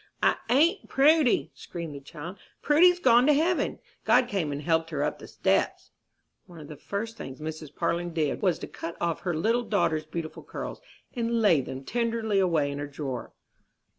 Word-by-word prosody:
"I - - +4
ain't 330 - +3
Prudy!" 290 -1 +4
screamed 170 -4 -7
the 140 - -7
child; 165 +7 -9 0.2
"Prudy's 350 +5 +5
gone 245 -3 +5
to 300 - +6
heaven. 330 +5 +1 0.3
God 250 - +4
came 185 -9 -1
and 145 +1 -4
helped 165 0 +1
her 145 -3 -2
up 150 - -2
the - - -10
steps." - - 0 0.6
One 175 -2 -12
of 150 - -10
the 150 - -7
first 220 +8 -5
things 135 - -8
Mrs. 155 -1 -7
Parlin 170 +1 -1
did 160 -3 -1
was 185 -4 +2
to - - -7
cut 165 +1 -7
off 170 -1 -1
her 175 -3 -2
little 225 +9 +1
daughter's 160 -8 0
beautiful 160 0 -5
curls, - - -7 0.3
and 235 -1 0
lay 185 -10 +4
them 130 +1 -7
tenderly 230 - 0
away 165 -6 +2
in 140 - -5
a 145 - -4
drawer. 140 -3 -6
175 Hz, 185 wpm, -27 LUFS, 155-235 Hz, 0.6 s, to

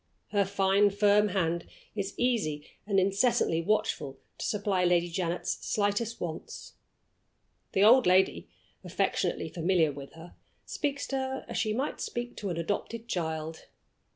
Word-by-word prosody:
Her 200 -1 +2
fine 195 +1 +3
firm 205 +1 +4
hand 170 -3 -1 0.3
is 200 -2 -3
easily 205 -13 0 0.2
and 200 -2 +3
incessantly 195 -3 +2
watchful 160 -8 -1 0.2
to - - -3
supply 200 -3 0
Lady 175 -1 +3
Janet's 175 0 -2
slightest 210 +2 0
wants. 165 -2 -6 1.0
The 195 - +3
old 240 +2 +7
lady 185 +1 +3 0.3
affectionately - - -1
familiar 170 -2 +1
with 140 0 -10
her 165 +2 -12 0.3
speaks 285 -2 -2
to 270 - -1
her 265 0 -3
as - - -3
she 215 - 0
might 260 +7 -2
speak 240 0 -4
to 200 - -3
an 170 - -3
adopted 210 +6 -3
child. 160 -4 -3
195 Hz, 140 wpm, -29 LUFS, 170-215 Hz, 1.0 s, old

